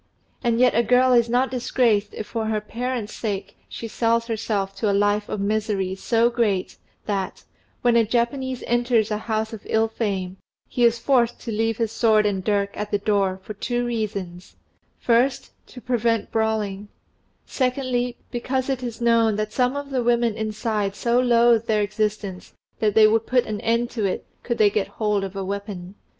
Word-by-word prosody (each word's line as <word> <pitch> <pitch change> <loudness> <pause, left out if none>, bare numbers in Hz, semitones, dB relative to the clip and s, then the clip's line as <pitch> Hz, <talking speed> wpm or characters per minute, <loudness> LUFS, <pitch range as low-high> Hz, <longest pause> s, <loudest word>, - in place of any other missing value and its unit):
And 235 -1 +1
yet 250 0 +5
a 235 - +4
girl 250 +2 +4
is 235 -1 +4
not 250 +2 +1
disgraced 235 -4 +1
if 215 - -5
for 225 0 -3
her 215 -1 0
parents' 235 +1 -4
sake 205 -3 -4
she 230 - -6
sells 230 +1 +1
herself 210 -4 -2
to 215 - 0
a - - +2
life 205 +1 +1
of 210 - -3
misery 200 -2 -1
so 230 +4 +2
great, 210 -6 0 0.3
that, 195 -3 -3 0.4
when 240 -1 +4
a 230 - +5
Japanese 245 +3 -1
enters 240 -2 +1
a 210 - -1
house 220 0 -2
of 220 - -7
ill 220 0 +2
fame, 195 -5 -3 0.3
he 245 - -1
is 235 0 +4
forced 240 -1 +2
to 230 - -5
leave 225 +1 0
his 225 -2 -1
sword 220 -2 +3
and 195 -2 0
dirk 200 -1 0
at 210 - -4
the 205 - +1
door 200 -2 0
for 215 - -7
two 240 +4 -2
reasons 200 -6 -4 0.4
first, 245 +3 +1 0.2
to 250 - -11
prevent 235 -3 0
brawling; 215 -2 -1 0.6
secondly, 250 -2 -1
because 260 +2 -2
it 260 -1 -2
is 240 -2 -6
known 230 -2 +3
that 215 0 -3
some 250 +2 +1
of 285 0 -5
the 260 -2 0
women 235 -1 +2
inside 215 -2 -2
so 235 +2 +1
loathe 235 -2 +4
their 215 -2 +2
existence 210 -2 -3 0.3
that 210 -2 +1
they 220 -1 +8
would 220 +1 +2
put 250 -1 +2
an 210 -1 -4
end 235 +1 0
to 225 -3 -3
it, 195 - -1 0.2
could 235 -1 -2
they 210 -2 +4
get 205 -1 0
hold 210 -2 -1
of 195 0 -6
a 195 -1 -3
weapon. 200 -2 -5
225 Hz, 185 wpm, -23 LUFS, 205-240 Hz, 0.6 s, they